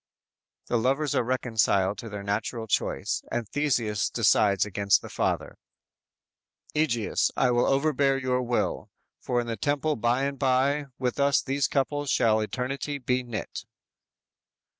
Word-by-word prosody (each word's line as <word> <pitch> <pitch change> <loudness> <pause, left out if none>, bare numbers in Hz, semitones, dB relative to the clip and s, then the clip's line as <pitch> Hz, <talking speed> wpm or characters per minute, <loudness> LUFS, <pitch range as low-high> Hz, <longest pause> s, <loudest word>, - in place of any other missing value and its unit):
"_ - - -39
The 120 - +1
lovers 135 +4 +1
are - - +2
reconciled 110 -5 +1
to 115 - -7
their 105 -1 -6
natural 110 +3 -2
choice, 105 - -1
and 120 -2 -2
Theseus 120 -7 0
decides 100 -2 +3
against 100 -1 +2
the - - -9
father: - - -2 1.2
_"Egeus, 125 -8 +1
I 125 - +3
will 120 0 +2
overbear 140 -1 +2
your 130 -1 0
will, 120 -1 -1 0.3
For 125 - -1
in 120 - -2
the 115 -1 -4
temple 145 +1 0
by 120 +4 +1
and 140 0 -3
by, 140 +2 +1
with 125 +1 -2
us 140 0 +4
These 135 0 0
couples 145 +1 -1
shall 110 -4 +3
eternally 135 +6 -3
be 125 -1 0
knit." 120 -4 -6
125 Hz, 145 wpm, -27 LUFS, 110-140 Hz, 1.2 s, us